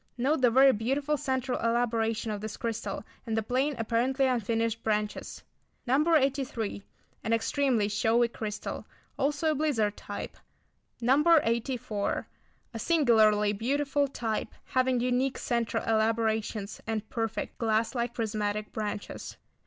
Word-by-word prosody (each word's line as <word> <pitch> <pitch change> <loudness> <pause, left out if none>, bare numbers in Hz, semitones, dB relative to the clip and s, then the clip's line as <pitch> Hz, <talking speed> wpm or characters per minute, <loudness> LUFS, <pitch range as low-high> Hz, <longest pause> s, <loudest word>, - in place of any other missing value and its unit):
Note 270 +4 +1
the 250 - +6
very 265 +3 +6
beautiful 275 +7 0
centre 265 -3 -1
elaboration 230 -1 0
of 205 -1 -4
this 215 -1 -5
crystal, 230 -1 -3 0.2
and 225 -1 -1
the 220 - +1
plain, 265 +6 0
apparently 240 +4 +1
unfinished 230 -2 0
branches. 210 -1 -2 0.4
No. 300 +6 +3
83. 270 -7 0 0.4
An 225 - 0
extremely 230 -1 +1
showy 225 +3 +2
crystal; 215 -3 -5 0.3
also 295 +3 +1
a - - +2
blizzard 260 -9 +1
type. - - -7 0.6
No. 265 +5 +4 0.2
84. 230 -2 -1 0.5
A 225 - -5
singularly 220 -9 +4
beautiful 280 +6 0
type, 225 -5 -2 0.2
having 255 -1 +1
unique 250 +2 +1
centre 235 -3 -1
elaborations, 220 -2 0
and 220 -1 -2
perfect, 225 -2 -3
glass 225 0 +1
like 240 -1 -2
prismatic 210 -2 -2
branches. 210 -1 -5
230 Hz, 125 wpm, -29 LUFS, 220-265 Hz, 0.6 s, the